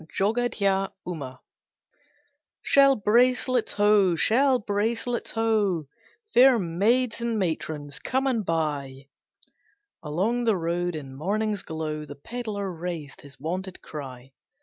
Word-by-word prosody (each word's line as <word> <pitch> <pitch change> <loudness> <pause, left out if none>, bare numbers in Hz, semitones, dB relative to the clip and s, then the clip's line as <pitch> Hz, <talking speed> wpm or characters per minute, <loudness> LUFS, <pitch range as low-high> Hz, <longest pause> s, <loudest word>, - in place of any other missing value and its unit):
JOGADHYA 200 -3 +1
UMA. 140 -8 -6 1.2
"Shell 275 -1 +5
bracelets 250 +3 +2
ho! 205 -3 +4
Shell 255 +9 +3
bracelets 230 +3 -2
ho! 215 -7 +1 0.5
Fair 255 0 +7
maids 220 +7 +1
and 235 -1 -1
matrons 155 -6 -3
come 265 +1 -1
and 245 -5 +1
buy!" 145 -5 -3 0.9
Along 200 +11 -1
the 220 -4 +3
road, 175 +1 -1
in 135 -3 -7
morning's 205 +6 -1
glow, 155 -1 -4
The 145 0 -9
pedlar 205 +2 -5
raised 165 -4 -6
his 140 -1 -15
wonted 185 +3 -5
cry. 135 -3 -9
195 Hz, 110 wpm, -26 LUFS, 160-230 Hz, 1.2 s, Fair